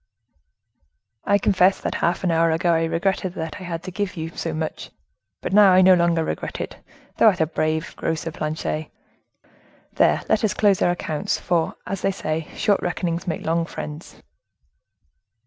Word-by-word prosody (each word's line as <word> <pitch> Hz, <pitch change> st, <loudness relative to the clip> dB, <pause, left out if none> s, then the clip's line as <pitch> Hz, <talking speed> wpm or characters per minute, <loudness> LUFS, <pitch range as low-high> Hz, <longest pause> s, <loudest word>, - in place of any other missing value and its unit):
"I 200 Hz, -, +4 dB
confess 190 Hz, -1 st, +3 dB
that -, -, -2 dB
half 170 Hz, +2 st, 0 dB
an 180 Hz, -, +2 dB
hour 165 Hz, 0 st, +3 dB
ago 165 Hz, +2 st, +2 dB
I 165 Hz, 0 st, +2 dB
regretted 185 Hz, +2 st, -1 dB
that 160 Hz, 0 st, -5 dB
I -, -, -7 dB
had 170 Hz, -1 st, -5 dB
to 185 Hz, -, -6 dB
give 200 Hz, -1 st, -3 dB
you 160 Hz, 0 st, -4 dB
so 165 Hz, 0 st, -4 dB
much; 155 Hz, 0 st, -4 dB, 0.5 s
but -, -, -4 dB
now 200 Hz, -2 st, +7 dB
I 185 Hz, +1 st, +6 dB
no 185 Hz, 0 st, +7 dB
longer 170 Hz, -2 st, +2 dB
regret -, -, -4 dB
it; -, -, -5 dB, 0.4 s
thou -, -, +6 dB
art 195 Hz, -5 st, +4 dB
a 160 Hz, -, +3 dB
brave 155 Hz, 0 st, -2 dB
grocer, 165 Hz, 0 st, -2 dB
Planchet. 155 Hz, 0 st, -3 dB, 1.1 s
There, -, -, +3 dB
let 215 Hz, -, +2 dB
us 215 Hz, -, +1 dB
close 200 Hz, -3 st, +3 dB
our -, -, +4 dB
accounts, 155 Hz, -3 st, -2 dB
for, 170 Hz, -3 st, 0 dB
as 195 Hz, 0 st, -4 dB
they -, -, +1 dB
say, 155 Hz, -3 st, -3 dB
short 205 Hz, -2 st, +2 dB
reckonings 175 Hz, 0 st, -2 dB
make 165 Hz, -, -3 dB
long 165 Hz, +1 st, +1 dB
friends." 150 Hz, +1 st, -8 dB
170 Hz, 175 wpm, -23 LUFS, 160-185 Hz, 1.1 s, now